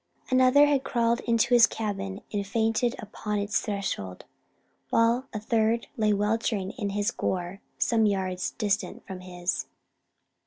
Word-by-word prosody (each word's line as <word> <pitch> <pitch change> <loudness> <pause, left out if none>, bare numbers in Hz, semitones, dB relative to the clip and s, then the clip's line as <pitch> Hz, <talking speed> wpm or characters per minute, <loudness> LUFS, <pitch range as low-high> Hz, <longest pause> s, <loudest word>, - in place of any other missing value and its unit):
Another 255 +3 +6
had 285 -2 +2
crawled 235 -2 +1
to 235 +1 +2
his 235 -1 +8
cabin 195 -2 -4
and 200 -1 -2
fainted 225 +3 +1
upon 210 -1 -4
its 205 +1 0
threshold; 195 - -4 0.6
while 235 +3 +2
a 215 - -4
third 225 +1 +1
lay 215 -2 +2
weltering 210 -1 0
in 205 -5 -4
his 205 +1 0
gore 180 +1 -3 0.2
some 225 -2 +2
yards 185 -2 -1
distant 205 -2 -1
from 190 -2 -7
his. 180 -1 -3
210 Hz, 140 wpm, -27 LUFS, 195-230 Hz, 0.6 s, his